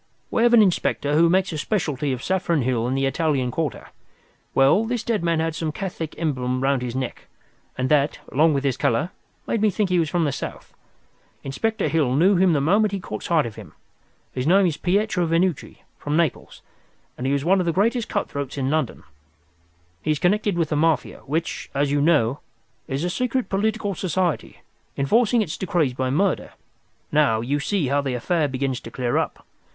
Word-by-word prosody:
"We -, -, +1 dB
have 240 Hz, 0 st, +5 dB
an 220 Hz, -, +7 dB
inspector 170 Hz, -6 st, 0 dB
who 165 Hz, +2 st, +5 dB
makes 185 Hz, +2 st, +2 dB
a 155 Hz, -, -3 dB
specialty 150 Hz, -, -1 dB
of 125 Hz, -1 st, -4 dB
Saffron 175 Hz, -6 st, 0 dB
Hill 120 Hz, -2 st, 0 dB
and 130 Hz, +2 st, -1 dB
the 135 Hz, -, +1 dB
Italian 135 Hz, -3 st, 0 dB
Quarter. 155 Hz, -4 st, -3 dB, 0.7 s
Well, 135 Hz, +10 st, +5 dB
this 235 Hz, 0 st, -2 dB
dead 220 Hz, -6 st, -1 dB
man 165 Hz, -1 st, +1 dB
had 165 Hz, 0 st, -1 dB
some 160 Hz, -1 st, -3 dB
Catholic 165 Hz, -2 st, -5 dB
emblem 130 Hz, -5 st, -1 dB
round 135 Hz, -1 st, +2 dB
his 125 Hz, -1 st, -4 dB
neck, 130 Hz, -2 st, -4 dB, 0.5 s
and 130 Hz, 0 st, 0 dB
that, 145 Hz, -1 st, +2 dB
along 155 Hz, +2 st, +3 dB
with 140 Hz, -, -1 dB
his 135 Hz, -3 st, 0 dB
colour, 150 Hz, +11 st, 0 dB, 0.3 s
made 230 Hz, -, -1 dB
me 215 Hz, -, +4 dB
think 200 Hz, 0 st, -1 dB
he 180 Hz, -, +3 dB
was 160 Hz, -3 st, 0 dB
from 175 Hz, +1 st, +1 dB
the 145 Hz, -, +1 dB
South. 135 Hz, -, -7 dB, 0.7 s
Inspector 220 Hz, +12 st, -1 dB
Hill 145 Hz, -6 st, +1 dB
knew 185 Hz, +7 st, +4 dB
him 180 Hz, -1 st, +4 dB
the 145 Hz, -, +2 dB
moment 200 Hz, +8 st, +2 dB
he 195 Hz, -, -1 dB
caught -, -, -6 dB
sight 165 Hz, -4 st, +1 dB
of 115 Hz, -2 st, -7 dB
him. 100 Hz, -8 st, -11 dB, 0.6 s
His 125 Hz, +2 st, -2 dB
name 190 Hz, +3 st, +5 dB
is 165 Hz, -4 st, +1 dB
Pietro 185 Hz, 0 st, 0 dB
Venucci, 165 Hz, -1 st, -1 dB, 0.2 s
from 145 Hz, +2 st, -1 dB
Naples, 165 Hz, -5 st, -2 dB, 0.5 s
and 125 Hz, -, -4 dB
he 135 Hz, -, +1 dB
is 140 Hz, +1 st, -1 dB
one 190 Hz, +2 st, +4 dB
of 180 Hz, -, -1 dB
the -, -, +3 dB
greatest 225 Hz, +6 st, +1 dB
cut 205 Hz, -, -1 dB
throats 140 Hz, -1 st, -5 dB
in 135 Hz, 0 st, -1 dB
London. 155 Hz, -5 st, -1 dB, 1.0 s
He -, -, -4 dB
is 155 Hz, -, +2 dB
connected 200 Hz, +3 st, +1 dB
with 165 Hz, -3 st, 0 dB
the 150 Hz, -, 0 dB
Mafia, 160 Hz, +1 st, +1 dB
which, 160 Hz, +4 st, -3 dB
as 140 Hz, 0 st, +1 dB
you 145 Hz, 0 st, +2 dB
know, 145 Hz, -5 st, +2 dB, 0.5 s
is 135 Hz, +3 st, -2 dB
a 175 Hz, -, 0 dB
secret 250 Hz, +4 st, -1 dB
political 210 Hz, +1 st, 0 dB
society, 185 Hz, -3 st, -2 dB, 0.4 s
enforcing 225 Hz, -, +3 dB
its 160 Hz, -, -5 dB
decrees 175 Hz, -9 st, 0 dB
by 130 Hz, 0 st, -2 dB
murder. 185 Hz, +8 st, 0 dB, 0.6 s
Now, 145 Hz, -7 st, +3 dB
you 140 Hz, +5 st, -1 dB
see 160 Hz, -2 st, -1 dB
how 145 Hz, +1 st, +2 dB
the 135 Hz, -3 st, -2 dB
affair 155 Hz, +5 st, 0 dB
begins 130 Hz, -1 st, -2 dB
to -, -, -10 dB
clear 125 Hz, -2 st, -1 dB
up. -, -, -4 dB
160 Hz, 200 wpm, -23 LUFS, 135-190 Hz, 1.0 s, an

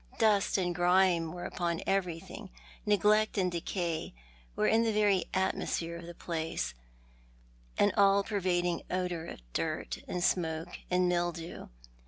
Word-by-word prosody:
Dust 210 Hz, -3 st, +3 dB
and 180 Hz, -2 st, 0 dB
grime 175 Hz, -1 st, +3 dB
were 175 Hz, +1 st, -6 dB
upon 170 Hz, -2 st, -2 dB
everything, 180 Hz, -4 st, -2 dB, 0.4 s
neglect 210 Hz, +1 st, +3 dB
and 185 Hz, -2 st, +2 dB
decay 170 Hz, -, -3 dB, 0.4 s
were -, -, +1 dB
in 225 Hz, -, +4 dB
the 230 Hz, -1 st, +2 dB
very 205 Hz, -3 st, +3 dB
atmosphere 170 Hz, -3 st, -1 dB
of 170 Hz, 0 st, -8 dB
the 175 Hz, -, -9 dB
place, 165 Hz, -, -3 dB, 1.0 s
an 205 Hz, -, +4 dB
all 200 Hz, 0 st, +5 dB
pervading 180 Hz, -4 st, 0 dB
odour 180 Hz, -3 st, -2 dB
of -, -, -9 dB
dirt -, -, -2 dB
and 180 Hz, -1 st, -2 dB
smoke 165 Hz, -1 st, 0 dB
and 180 Hz, 0 st, +3 dB
mildew. 175 Hz, -1 st, -2 dB
180 Hz, 135 wpm, -31 LUFS, 170-195 Hz, 1.0 s, all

